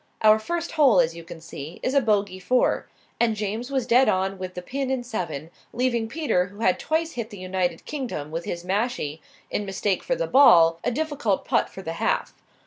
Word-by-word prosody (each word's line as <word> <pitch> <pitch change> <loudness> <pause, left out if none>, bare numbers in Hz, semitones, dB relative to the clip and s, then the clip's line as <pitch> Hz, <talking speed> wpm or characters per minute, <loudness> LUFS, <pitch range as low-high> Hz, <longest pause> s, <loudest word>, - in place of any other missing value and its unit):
Our 215 0 +7
first 340 +9 -3
hole, 275 - +5
as 165 -1 +2
you 170 - -9
can 170 0 -10
see, 160 0 -9
is 255 - 0
a 280 - +4
bogey 205 -5 0
four, 250 +7 +1 0.3
and 230 -2 +2
James 215 +4 -3
was 265 -3 -1
dead 250 +2 +5
on 190 +1 0
the 185 -1 -5
pin 270 +5 -3
in 260 -2 -1
seven, 170 - -5 0.2
leaving 240 -2 0
Peter, 230 - 0
who 200 +4 -12
had 185 -5 +2
twice 320 +1 -1
hit 235 -5 -5
the 205 - -10
United 185 -2 -2
Kingdom 240 - -5
with 165 +1 -4
his 170 0 -5
mashie 190 - -2 0.3
in 210 - -1
mistake 195 0 -1
for - - -1
the - - -1
ball, 165 -12 +6
a - - +1
difficult 280 -7 -1
putt - - +1
for 190 - -10
the 165 - -4
half. - - 0
210 Hz, 205 wpm, -24 LUFS, 180-255 Hz, 0.3 s, Our